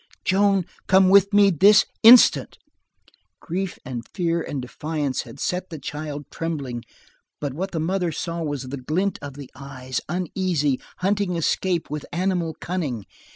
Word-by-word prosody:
"Joan, 195 -1 +3 0.2
come 190 0 +5
to 200 -1 +7
me 205 -1 +5
this 200 +5 +6 0.2
instant." 235 +2 +7 0.8
Grief 185 +2 -4
and 125 -3 -5
fear 170 -3 0
and 145 -3 -4
defiance 145 +1 -3
had 140 - -12
set 180 +5 -2
the 165 - -7
child 145 0 -6
trembling, 140 -8 -4 0.6
but 145 -3 -3
what 185 +7 -3
the 165 - -3
mother 175 +1 0
saw 170 +2 -4
was 145 -4 -3
the 140 - -5
glint 175 +9 -1
of 140 -2 -8
the 140 -2 -10
eyes, 130 -2 -6
uneasy, 175 -5 -1 0.2
hunting 195 -1 0
escape 170 0 -1
with 150 -1 -4
animal 175 -2 -1
cunning. 145 - -3
165 Hz, 150 wpm, -23 LUFS, 145-185 Hz, 0.8 s, to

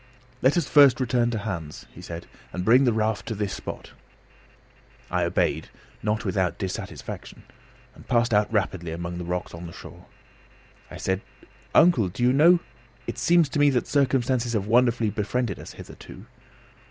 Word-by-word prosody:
"Let 135 +6 +3
us 170 - +1
first 140 -3 +6
return 120 -2 +1
to 115 - -2
Hans," 90 -8 -5
he 90 - -11
said, 85 -1 -7 0.3
"and 90 0 -4
bring 125 +4 +5
the 120 - +4
raft 110 0 -1
to 115 - -3
this 100 -1 -2
spot." - - -7 1.2
I - - +1
obeyed, - - 0 0.3
not 105 +2 -1
without 95 -2 0
dissatisfaction, 95 -2 -6 0.5
and - - -16
passed 120 -1 +2
out 105 +1 +2
rapidly 95 -5 -1
among 85 +1 -5
the - - -4
rocks 90 +1 -4
on 85 +1 -8
the 85 - -10
shore. - - -12 0.8
I - - -9
said: 95 +1 -1 0.5
"Uncle, 155 - +5
do 120 - -4
you 125 +1 +4
know 170 +5 +5 0.4
it - - -5
seems 170 -2 +4
to 145 - -2
me 145 0 +6
that 125 -3 0
circumstances 130 -3 +1
have 105 -3 0
wonderfully 120 -1 +2
befriended 105 +1 -2
us - - -10
hitherto?" - - -12
110 Hz, 165 wpm, -25 LUFS, 95-125 Hz, 1.2 s, first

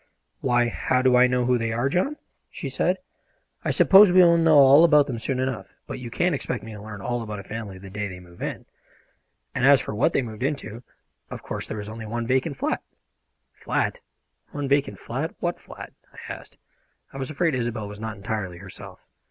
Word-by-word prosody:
"Why, 120 -2 +2
how 125 +2 0
do 130 -1 +5
I 125 +1 +6
know 125 -1 +1
who 125 0 +2
they 115 0 -1
are, 120 +4 0
John?" 185 - 0 0.3
she - - -6
said. - - +1 0.7
"I - - -1
suppose 195 0 +7
we 185 0 +7
will 170 -1 +6
know 165 -2 +5
all 140 +3 +8
about 150 -4 +6
them 120 -4 -4
soon 130 +3 -2
enough, 125 -7 -3
but - - -6
you 125 -2 -7
can't 175 +8 +1
expect 125 -3 -3
me 110 - -8
to 105 - -9
learn 105 -1 -8
all 120 +3 -2
about 105 -2 -5
a 100 - -7
family 105 -2 -7
the 95 0 -11
day 105 +1 -3
they 90 -2 -8
move 85 -1 -16
in. - - -4 0.9
And 130 - -2
as 140 0 +7
for 110 - -5
what 105 - +2
they - - +2
moved 110 -2 -8
into, 135 -4 -3 0.5
of - - -8
course - - -5
there 110 - -5
was 105 0 -6
only 110 0 -7
one 115 +2 -3
vacant 130 +4 0
flat." - - -1 0.7
"Flat? - - -2 0.5
One 145 -1 -4
vacant 140 -7 +1
flat? 135 - -4
What 175 0 -2
flat?" - - -11 0.2
I - - -8
asked. - - -13 0.6
I - - -7
was 135 -1 -4
afraid 160 +1 0
Isobel 120 -4 -2
was 105 0 -9
not 110 -1 -5
entirely 100 -3 -4
herself. 95 +1 -11
125 Hz, 210 wpm, -24 LUFS, 110-140 Hz, 0.9 s, all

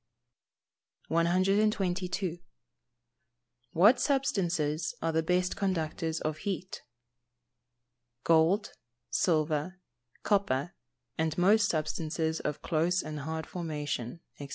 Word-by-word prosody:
122. 185 0 +1 1.3
What 210 +10 +6
substances 175 - 0
are 165 - 0
the 160 0 +1
best 180 +2 0
conductors 165 -4 -1
of 155 0 -2
heat? 185 -1 -4 1.4
Gold, 165 +5 +3 0.4
silver, 155 +2 0 0.4
copper, 175 -7 +1 0.5
and 160 -1 0
most 205 +4 +4
substances 160 0 -1
of 150 0 -4
close 170 +3 +1
and 155 -1 -5
hard 160 +2 -4
formation, 150 -5 -4 0.2
&c. 140 -1 -7
165 Hz, 85 wpm, -30 LUFS, 155-185 Hz, 1.4 s, What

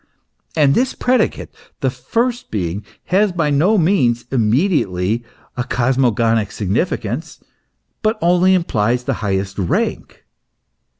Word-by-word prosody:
And 145 -3 +4
this 255 - +1
predicate 250 -3 0 0.3
the 130 -3 +1
first 235 - -2
Being, 95 0 -3 0.3
has 200 +1 +4
by 165 -4 0
no 175 +10 +3
means 155 -11 +2
immediately 115 - +1 0.3
a 125 - -1
cosmogonic 120 -4 +1
significance, 115 - -2 0.6
but 215 0 +1
only 180 +1 +4
implies 125 - 0
the - - -1
highest 95 -1 -2
rank. 90 - -2
130 Hz, 110 wpm, -18 LUFS, 110-185 Hz, 0.6 s, And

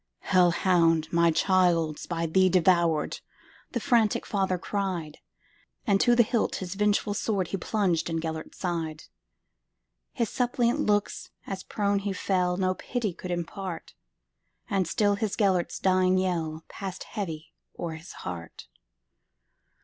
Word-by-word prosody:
"Hell 180 -2 +4
hound! 165 -2 +3
my 170 0 +4
child 165 -3 +2
's - - -8
by 165 -1 -2
thee 185 +3 +3
devoured,"The 170 -4 0
frantic 230 -5 +2
father 190 -3 0
cried; 185 -5 -3 0.7
And 200 -4 +3
to 240 - +5
the 240 - +6
hilt 230 0 0
his 185 -1 -4
vengeful 205 0 +1
swordHe 195 -3 -1
plunged 185 -7 0
in 165 0 -1
Gêlert's 160 -1 -5
side. 165 -4 -3 1.1
His 235 - -1
suppliant 245 -1 +1
looks, 205 0 0 0.2
as 195 -1 -5
prone 200 -1 0
he 200 0 -2
fell, 180 -2 0
No 185 -1 +1
pity 220 0 -3
could 180 - -8
impart; 175 0 -5 0.8
But 190 -3 +1
still 205 +2 +2
his 210 -1 -2
Gêlert's 190 -5 +1
dying 185 0 +3
yellPassed 175 +1 -3
heavy 165 -6 -6 0.2
o'er 170 -2 -4
his 160 +3 -10
heart. 85 -2 -7
185 Hz, 130 wpm, -27 LUFS, 165-200 Hz, 1.1 s, the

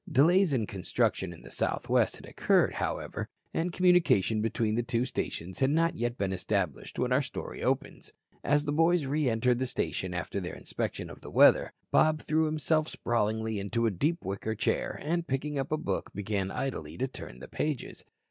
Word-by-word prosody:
Delays 175 +6 +5
in 120 -6 +1
construction 100 0 -1
in 85 - -12
the - - -12
Southwest - - +1
had - - -12
occurred, - - +2
however, - - -3 0.2
and 170 +2 0
communication 170 - +3
between 110 0 0
the 120 - +1
two 120 0 0
stations 90 -7 -4
had 135 - +3
not 165 +3 +2
yet 120 +1 -2
been 95 -1 -1
established 95 -4 -2
when - - 0
our - - +4
story - - -6
opens. - - -2 0.3
As 145 0 +3
the 145 - 0
boys 165 +1 +3
re 145 0 +1
entered 120 +2 +2
the 130 - 0
station 95 -6 -2
after 90 +3 -3
their 90 -2 -5
inspection - - -4
of - - -12
the - - -9
weather, - - +5 0.2
Bob 155 0 +4
threw 155 +2 +1
himself 155 0 +1
sprawlingly 110 -3 -1
into 115 +4 -1
a 115 - +3
deep 155 - -1
wicker 100 +3 -3
chair - - -1
and, 170 +3 -1
picking 140 +2 -1
up 135 +1 -3
a 155 - +2
book, 155 - -3
began 100 -1 -1
idly 80 - -4
to 130 - 0
turn 95 - -9
the 65 - -10
pages. 150 -4 -3
120 Hz, 185 wpm, -29 LUFS, 100-155 Hz, 0.3 s, Delays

